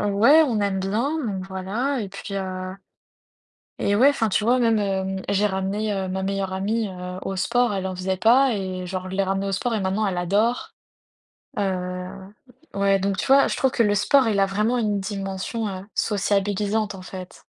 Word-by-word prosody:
ouais, 220 Hz, +10 st, +5 dB
on 235 Hz, -8 st, 0 dB
aime 200 Hz, -1 st, 0 dB
bien, 230 Hz, +11 st, -1 dB
donc 190 Hz, -3 st, -4 dB
voilà. 210 Hz, +9 st, -2 dB
Et 205 Hz, -, -4 dB
puis 200 Hz, +1 st, -8 dB
heu, 185 Hz, -1 st, -4 dB, 1.0 s
et 200 Hz, -, +1 dB
ouais, 250 Hz, +7 st, +6 dB
enfin, 230 Hz, -6 st, +1 dB
tu 210 Hz, -, +1 dB
vois, 245 Hz, +3 st, +3 dB
même, 230 Hz, -3 st, +3 dB
hem, 190 Hz, -1 st, -1 dB
j'ai 200 Hz, +1 st, +2 dB
ramené, 200 Hz, +2 st, -1 dB
heu, 190 Hz, -1 st, -2 dB
ma 190 Hz, +1 st, -3 dB
meilleure 195 Hz, 0 st, -2 dB
amie, 210 Hz, +3 st, -1 dB
heu, 180 Hz, -1 st, -7 dB
au 195 Hz, -, -3 dB
sport. 245 Hz, +4 st, +1 dB
Elle 190 Hz, -1 st, -2 dB
en 190 Hz, -, -3 dB
faisait 185 Hz, +1 st, -2 dB
pas 245 Hz, +5 st, +4 dB
et 185 Hz, -2 st, -4 dB
genre 185 Hz, 0 st, -5 dB
je 190 Hz, -, -4 dB
l'ai 195 Hz, -, +2 dB
ramenée 195 Hz, +1 st, -1 dB
au -, -, -2 dB
sport 230 Hz, +5 st, -1 dB
et 215 Hz, -, 0 dB
maintenant, 195 Hz, +3 st, 0 dB
elle 190 Hz, -, -1 dB
adore. 205 Hz, +7 st, 0 dB, 0.8 s
Heu 180 Hz, -2 st, -2 dB, 0.6 s
ouais, 200 Hz, 0 st, +3 dB
donc 195 Hz, 0 st, -1 dB
tu -, -, -2 dB
vois, 275 Hz, +1 st, +5 dB
je -, -, -2 dB
trouve 265 Hz, -, +2 dB
que 240 Hz, -, +2 dB
le 205 Hz, -2 st, +2 dB
sport, 255 Hz, +5 st, +4 dB
il 205 Hz, -2 st, +1 dB
a 195 Hz, -, +4 dB
vraiment 210 Hz, +5 st, 0 dB
une 210 Hz, -3 st, 0 dB
dimension, 195 Hz, +3 st, -4 dB
heu, 190 Hz, 0 st, -6 dB
sociabilisante, 205 Hz, +1 st, 0 dB
en 190 Hz, -, -9 dB
fait. 185 Hz, 0 st, -10 dB
200 Hz, 200 wpm, -23 LUFS, 190-220 Hz, 1.0 s, ouais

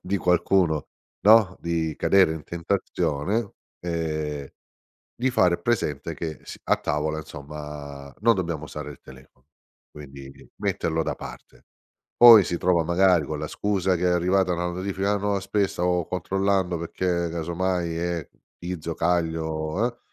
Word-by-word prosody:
di 100 Hz, +1 st, -1 dB
qualcuno, 90 Hz, -3 st, +2 dB, 0.4 s
no, 105 Hz, -3 st, +6 dB
di 80 Hz, -2 st, -2 dB
cadere 95 Hz, -5 st, +4 dB
in 80 Hz, -, -8 dB
tentazione, 90 Hz, +2 st, -2 dB, 0.3 s
ehm, 80 Hz, -4 st, -3 dB, 0.7 s
di 130 Hz, +2 st, 0 dB
fare 90 Hz, -8 st, +3 dB
presente 85 Hz, -, -1 dB
che 80 Hz, 0 st, -5 dB
s -, -, -10 dB
a -, -, +3 dB
tavola 75 Hz, +2 st, -1 dB
insomma 75 Hz, -2 st, -8 dB
non 115 Hz, +1 st, +5 dB
dobbiamo 85 Hz, -6 st, -3 dB
usare 75 Hz, +1 st, -7 dB
il 70 Hz, -, -11 dB
telefono, 65 Hz, 0 st, -17 dB, 0.4 s
quindi 70 Hz, -2 st, -11 dB, 0.2 s
metterlo 80 Hz, 0 st, -1 dB
da -, -, -2 dB
parte. -, -, -12 dB, 0.5 s
Poi 115 Hz, -3 st, +10 dB
si 85 Hz, -, -2 dB
trova 90 Hz, -1 st, +2 dB
magari 90 Hz, -1 st, +3 dB
con -, -, -4 dB
la -, -, -3 dB
scusa 95 Hz, -2 st, 0 dB
che 85 Hz, -, -5 dB
è -, -, +4 dB
arrivata 90 Hz, +1 st, +2 dB
una 90 Hz, 0 st, -1 dB
notifica 95 Hz, +3 st, -1 dB
nuova, 100 Hz, 0 st, 0 dB
spes 100 Hz, 0 st, 0 dB
"Stavo 90 Hz, -1 st, 0 dB
controllando 95 Hz, 0 st, 0 dB
perché 85 Hz, +2 st, -4 dB, 0.2 s
casomai 85 Hz, +1 st, -2 dB
è 85 Hz, -2 st, -3 dB, 0.3 s
Tizio, 85 Hz, -2 st, -5 dB
caglio", 80 Hz, +2 st, 0 dB
eh, 120 Hz, -1 st, -5 dB
85 Hz, 140 wpm, -25 LUFS, 80-95 Hz, 0.7 s, Poi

